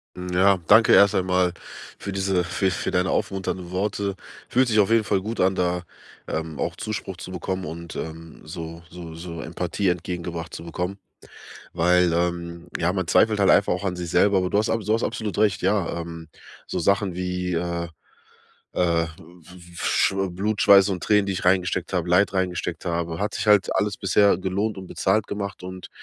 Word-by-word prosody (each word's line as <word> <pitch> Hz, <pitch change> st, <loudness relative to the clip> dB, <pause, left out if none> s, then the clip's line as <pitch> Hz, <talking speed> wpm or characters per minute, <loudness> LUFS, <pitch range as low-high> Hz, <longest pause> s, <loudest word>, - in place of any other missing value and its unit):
Hm, 90 Hz, 0 st, -6 dB
ja. 95 Hz, +2 st, +4 dB
Danke 110 Hz, +2 st, +7 dB
erst 100 Hz, +1 st, +6 dB
einmal 90 Hz, -1 st, +2 dB, 0.4 s
für 100 Hz, -, -6 dB
diese 95 Hz, -2 st, 0 dB
für 95 Hz, +2 st, 0 dB
für -, -, -2 dB
deine 90 Hz, +1 st, +1 dB
aufmunternden 95 Hz, -2 st, -2 dB
Worte. 100 Hz, +1 st, -1 dB, 0.3 s
Fühlt 130 Hz, +1 st, +3 dB
sich 110 Hz, -2 st, +2 dB
auf 100 Hz, -, +4 dB
jeden 115 Hz, -1 st, +4 dB
Fall 95 Hz, -1 st, +1 dB
gut 110 Hz, +4 st, -5 dB
an, 95 Hz, +1 st, +3 dB
da, 90 Hz, -1 st, 0 dB, 0.4 s
ähm, 80 Hz, -1 st, -4 dB
auch -, -, -2 dB
Zuspruch 110 Hz, -4 st, -5 dB
zu 95 Hz, -, -8 dB
bekommen 95 Hz, 0 st, -3 dB
und, 85 Hz, +2 st, -7 dB
ähm, 80 Hz, 0 st, -7 dB
so 85 Hz, 0 st, -8 dB
so 85 Hz, -1 st, -9 dB
so 85 Hz, 0 st, -7 dB
Empathie 90 Hz, +4 st, -2 dB
entgegengebracht 85 Hz, -2 st, -4 dB
zu 85 Hz, -, -7 dB
bekommen. 90 Hz, +3 st, -4 dB, 0.8 s
Weil, 90 Hz, 0 st, +3 dB
ähm, 85 Hz, 0 st, -2 dB
ja, 85 Hz, +2 st, +1 dB
man 95 Hz, -3 st, -2 dB
zweifelt 105 Hz, +1 st, +3 dB
halt 100 Hz, -, +5 dB
einfach 100 Hz, -, +4 dB
auch 90 Hz, +2 st, -3 dB
an 90 Hz, -2 st, -1 dB
sich 90 Hz, -1 st, -5 dB
selber, 100 Hz, +2 st, +4 dB
aber 90 Hz, -1 st, -1 dB
du 100 Hz, -, +2 dB
hast 105 Hz, -, +1 dB
abso 115 Hz, -2 st, -1 dB
du -, -, +4 dB
hast 115 Hz, -, 0 dB
absolut 110 Hz, -3 st, -3 dB
recht, 105 Hz, -4 st, +2 dB
ja, 95 Hz, -3 st, 0 dB
ähm, 85 Hz, -1 st, -8 dB, 0.4 s
so -, -, -2 dB
Sachen 100 Hz, -2 st, +1 dB
wie, 90 Hz, 0 st, -2 dB
äh, 85 Hz, 0 st, -2 dB, 0.9 s
äh, 85 Hz, -2 st, +2 dB
f -, -, -7 dB, 0.6 s
f 85 Hz, -, -6 dB
Schw 95 Hz, 0 st, +2 dB
Blut, 100 Hz, +4 st, -2 dB
Schweiß 100 Hz, 0 st, +7 dB
und 90 Hz, -2 st, -3 dB
Tränen, 105 Hz, -1 st, +3 dB
die 100 Hz, -, -1 dB
ich 95 Hz, -, -4 dB
reingesteckt 90 Hz, 0 st, +1 dB
habe, 90 Hz, -1 st, -1 dB
Leid 95 Hz, +3 st, +3 dB
reingesteckt 90 Hz, -2 st, -2 dB
habe, 85 Hz, -1 st, -2 dB
hat 105 Hz, +1 st, -2 dB
sich -, -, -3 dB
halt 105 Hz, -2 st, +4 dB
alles 100 Hz, +1 st, 0 dB
bisher 100 Hz, +1 st, +3 dB
gelohnt 100 Hz, +3 st, -1 dB
und 95 Hz, -, -8 dB
bezahlt 100 Hz, +4 st, 0 dB
gemacht 100 Hz, -1 st, -5 dB
und 95 Hz, 0 st, -8 dB
90 Hz, 195 wpm, -24 LUFS, 85-100 Hz, 0.9 s, Danke